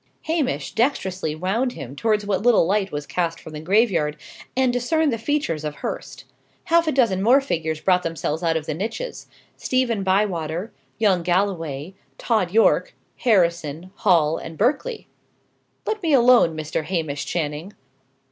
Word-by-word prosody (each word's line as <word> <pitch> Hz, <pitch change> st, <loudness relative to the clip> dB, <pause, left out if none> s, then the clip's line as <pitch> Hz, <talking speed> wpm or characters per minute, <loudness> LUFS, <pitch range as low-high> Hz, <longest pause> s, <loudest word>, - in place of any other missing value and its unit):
Hamish 315 Hz, -5 st, -1 dB
dextrously 190 Hz, -, 0 dB
wound 215 Hz, +10 st, -1 dB
him 135 Hz, +1 st, -8 dB
towards 210 Hz, +4 st, 0 dB
what 195 Hz, -2 st, 0 dB
little 235 Hz, -6 st, +4 dB
light 195 Hz, +2 st, 0 dB
was 145 Hz, 0 st, -4 dB
cast 170 Hz, 0 st, -2 dB
from 160 Hz, -, -11 dB
the 150 Hz, -, -5 dB
graveyard, 170 Hz, -4 st, +2 dB, 0.4 s
and 260 Hz, -2 st, +3 dB
discerned 285 Hz, +4 st, +1 dB
the 230 Hz, -, -3 dB
features 225 Hz, -, -1 dB
of 150 Hz, -1 st, -4 dB
Hurst. -, -, -6 dB, 0.4 s
Half 335 Hz, 0 st, +3 dB
a -, -, +3 dB
dozen 230 Hz, -9 st, +2 dB
more 245 Hz, +7 st, +5 dB
figures 160 Hz, -, -2 dB
brought 180 Hz, +1 st, +2 dB
themselves 165 Hz, -1 st, -3 dB
out 165 Hz, -2 st, +1 dB
of 155 Hz, -, -5 dB
the 155 Hz, -, -2 dB
niches 225 Hz, -, -5 dB, 0.3 s
Stephen 250 Hz, -5 st, 0 dB
Bywater, 190 Hz, -1 st, 0 dB, 0.3 s
young 200 Hz, -5 st, +3 dB
Galloway, 175 Hz, -4 st, -1 dB, 0.2 s
Tod 215 Hz, -7 st, 0 dB
Yorke, 225 Hz, -, +3 dB, 0.2 s
Harrison, 170 Hz, -, +1 dB
Hall, 165 Hz, -7 st, +3 dB
and 160 Hz, -, -8 dB
Berkeley. 300 Hz, -, 0 dB, 0.8 s
"Let 435 Hz, -1 st, -2 dB
me 325 Hz, -4 st, +1 dB
alone, 240 Hz, -, +5 dB
Mr. 155 Hz, 0 st, -3 dB
Hamish 155 Hz, -4 st, -3 dB
Channing. 160 Hz, +3 st, -3 dB
190 Hz, 150 wpm, -22 LUFS, 160-240 Hz, 0.8 s, more